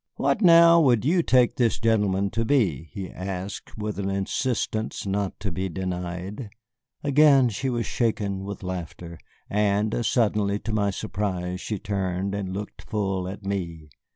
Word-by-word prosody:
"What, - - 0
now, 170 -2 +7
would 125 -6 +3
you 175 +4 +3
take 125 -6 +3
this 120 -3 +2
gentleman 100 -3 +1
to 115 - -1
be?" 95 - +1
he 95 +2 -5
asked 95 +3 -6
with 105 -1 -4
an 100 -1 -1
insistence 110 +3 -2
not 100 0 -2
to 100 - -2
be 95 +3 -3
denied. 90 +4 -5 0.5
Again 140 -3 +5
she 125 +5 -2
was 120 -2 -1
shaken 100 -5 -1
with 100 0 -7
laughter, 85 -2 -6 0.3
and 105 +2 +1
suddenly 105 -4 +1
to 110 +1 -5
my 100 -1 +1
surprise 95 -2 -3
she 105 - -3
turned 95 -1 -2
and 100 -2 -3
looked 100 +2 -6
full 95 -4 -2
at 100 +2 -8
me. 85 -6 -4
100 Hz, 155 wpm, -25 LUFS, 95-115 Hz, 0.5 s, now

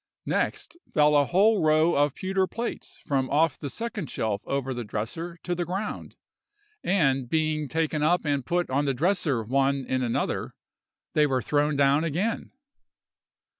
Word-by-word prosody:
Next 340 - -2
fell 150 0 +4
a 145 -1 +5
whole 205 +4 +4
row 155 +2 +4
of 145 -1 +2
pewter 190 0 0
plates 235 +4 -5
from 135 -2 0
off 150 0 +2
the 140 - -4
second 225 - -5
shelf 110 -3 -2
over 135 -1 -1
the 120 -1 -4
dresser 140 +12 -5
to 180 - -1
the 175 0 -1
ground, 190 +5 -5 0.7
and, 135 -9 +1
being 155 -1 0
taken 160 0 -1
up 170 +3 +2
and 140 -2 0
put 175 +1 -1
on 140 +2 +1
the 135 -2 0
dresser 155 - +1
one 135 +3 +1
in 130 +1 -1
another, 120 -2 -2 0.6
they 150 -1 +4
were 130 -2 +1
thrown 150 0 +1
down 140 +2 +3
again. 180 +8 -1
150 Hz, 160 wpm, -26 LUFS, 135-175 Hz, 0.7 s, a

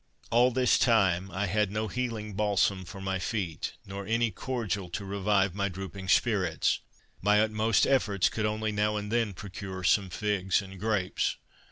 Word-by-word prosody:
All 120 +2 +5
this 125 0 +3
time 95 -6 +3
I 95 +2 -2
had 105 +2 +1
no 110 +2 -2
healing 110 -2 -3
balsam 100 -2 +1
for 95 - -9
my 95 0 -2
feet, 90 -4 -3
nor 100 0 -7
any 115 0 +1
cordial 105 -5 -3
to 90 +3 -5
revive 100 -1 +1
my 100 0 -1
drooping 95 0 -7
spirits. 95 -6 +2 0.4
My 105 +2 +4
utmost 110 0 +2
efforts 105 -8 +2
could 110 -1 -1
only 110 0 -1
now 105 0 0
and 105 0 -4
then 115 -3 +1
procure 95 -1 -7
some 95 +1 +3
figs 100 -1 0
and 95 -1 -9
grapes. 105 -3 0
105 Hz, 165 wpm, -29 LUFS, 95-110 Hz, 0.4 s, All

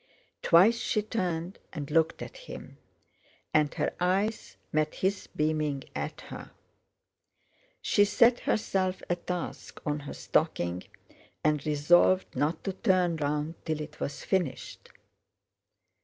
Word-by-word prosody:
Twice 205 +8 +6
she 215 - 0
turned 180 -4 -2
and 150 -4 -6
looked 160 +1 +2
at - - -9
him, - - -9 0.7
and 150 -1 +4
her 150 -3 0
eyes 195 +5 0 0.2
met 155 0 +1
his 190 +1 -1
beaming 150 -3 -1
at - - -4
her. - - -9 1.3
She 205 - +4
set 235 +4 +4
herself 190 -3 0
a - - +3
task 175 0 -5
on 150 -1 0
her 140 0 -7
stocking 85 +1 0 0.6
and 150 -2 +2
resolved 175 +5 +4
not 155 +3 0
to 195 - -2
turn 185 -4 +2
round 150 +2 -2
till 155 -2 -2
it 150 0 -8
was 140 - -4
finished. 180 -9 -2
165 Hz, 125 wpm, -29 LUFS, 150-190 Hz, 1.3 s, Twice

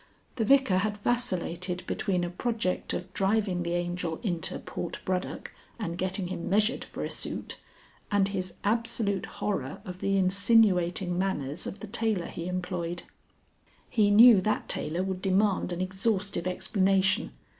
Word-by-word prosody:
The 225 - +1
Vicar 265 -7 +4
had 210 +1 -1
vacillated 185 -6 -1
between 185 -4 -1
a 175 - -2
project 215 -1 -2
of 185 +1 -5
driving 195 -2 +1
the 170 0 -2
Angel 175 -1 -2
into 175 -7 -2
Portbroddock 180 +1 -4 0.2
and 170 -7 -3
getting 185 0 -2
him 170 -2 -4
measured 215 +6 +2
for - - -6
a - - -3
suit, - - -4 0.5
and 200 -1 +3
his 185 -2 -3
absolute 220 -2 0
horror 145 -10 -3
of 180 0 -7
the 195 +1 +1
insinuating 185 -2 +3
manners 150 -6 -2
of 200 - -7
the 215 - -6
tailor 205 -3 0
he 170 +1 -6
employed. 180 -1 -3 0.9
He 215 -3 +4
knew 220 0 +8
that 215 +3 -1
tailor 170 +4 -1
would 190 -1 -3
demand 195 0 +2
an 175 +1 -3
exhaustive 190 -1 -1
explanation. 195 +1 +1
190 Hz, 145 wpm, -28 LUFS, 180-210 Hz, 0.9 s, knew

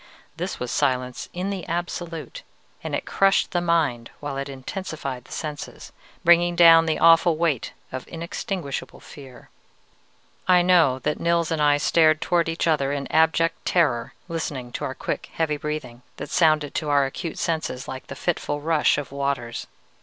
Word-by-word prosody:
This - - -4
was 125 -1 -4
silence 125 -1 -1
in 185 +3 -3
the 190 -3 -4
absolute, 175 - -4 0.4
and - - -2
it - - -3
crushed 195 0 +2
the 175 - 0
mind 155 -9 0
while 145 -1 -5
it 140 +1 -4
intensified 135 -2 -6
the - - -18
senses, 150 -2 -6 0.3
bringing 175 0 +5
down 165 -1 +7
the 160 - +1
awful 165 0 +5
weight 155 -7 0 0.2
of 130 0 -6
inextinguishable 170 -2 -5
fear. 135 -4 -13 1.0
"I 180 -1 +5
know 170 -8 +4
that 140 +3 -2
Nils 170 -1 +1
and 160 -2 0
I 145 -1 +4
stared 155 +1 +4
towards 170 0 +1
each 165 - -1
other 150 -4 +1
in 140 -1 -2
abject 160 +1 +2
terror, 145 -10 +1
listening 145 -7 -4
to - - -4
our 130 - -4
quick, - - -4
heavy 155 -2 0
breathing, 145 -5 -5 0.2
that - - -7
sounded 155 -3 +3
to 155 -3 -2
our 140 -1 +4
acute 155 +4 -5
senses 155 -6 -2
like 130 0 -7
the - - -7
fitful 145 -4 -2
rush 155 0 +2
of 140 -3 -5
waters. 140 -4 -3
155 Hz, 165 wpm, -24 LUFS, 140-170 Hz, 1.0 s, down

